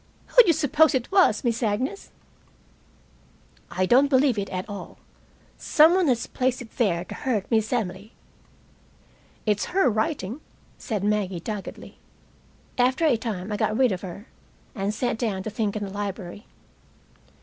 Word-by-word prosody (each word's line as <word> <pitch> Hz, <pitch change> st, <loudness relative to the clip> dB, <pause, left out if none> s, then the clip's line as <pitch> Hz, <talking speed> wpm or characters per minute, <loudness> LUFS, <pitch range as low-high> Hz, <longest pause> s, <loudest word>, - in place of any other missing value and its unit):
"Who -, -, +8 dB
d'you 360 Hz, -8 st, +4 dB
suppose 315 Hz, 0 st, +3 dB
it 250 Hz, -2 st, -2 dB
was, 375 Hz, -, +4 dB
Miss 235 Hz, -1 st, 0 dB
Agnes?" 250 Hz, -, -2 dB, 1.6 s
"I 185 Hz, +1 st, 0 dB
don't 255 Hz, +8 st, +5 dB
believe 260 Hz, -4 st, +3 dB
it 200 Hz, -, -4 dB
at 185 Hz, 0 st, -4 dB
all. 200 Hz, -3 st, -8 dB, 0.6 s
Some 320 Hz, +2 st, +5 dB
one 370 Hz, -2 st, +2 dB
has 245 Hz, -3 st, +1 dB
placed 255 Hz, 0 st, -1 dB
it 235 Hz, -3 st, -11 dB
there 180 Hz, -7 st, +1 dB
to -, -, -8 dB
hurt 220 Hz, -7 st, -2 dB
Miss 220 Hz, -1 st, +1 dB
Emily." 210 Hz, -3 st, -3 dB, 1.3 s
"It's 210 Hz, -2 st, +1 dB
her 385 Hz, -, +5 dB
writing," 220 Hz, -, -2 dB, 0.4 s
said 210 Hz, -4 st, -3 dB
Maggie 205 Hz, -4 st, 0 dB
doggedly. 205 Hz, +3 st, -7 dB, 0.8 s
After 260 Hz, +6 st, +2 dB
a 290 Hz, -6 st, +4 dB
time 215 Hz, -4 st, -4 dB
I 210 Hz, -, -1 dB
got 215 Hz, +1 st, 0 dB
rid 255 Hz, -3 st, +3 dB
of 185 Hz, -1 st, -3 dB
her, 195 Hz, +3 st, -8 dB, 0.5 s
and 200 Hz, -4 st, -2 dB
sat 230 Hz, +1 st, -2 dB
down 200 Hz, -6 st, -2 dB
to 215 Hz, -, -5 dB
think 210 Hz, -1 st, -2 dB
in 210 Hz, -, -3 dB
the 195 Hz, -, -5 dB
library. 200 Hz, 0 st, -6 dB
220 Hz, 155 wpm, -25 LUFS, 200-260 Hz, 1.6 s, Who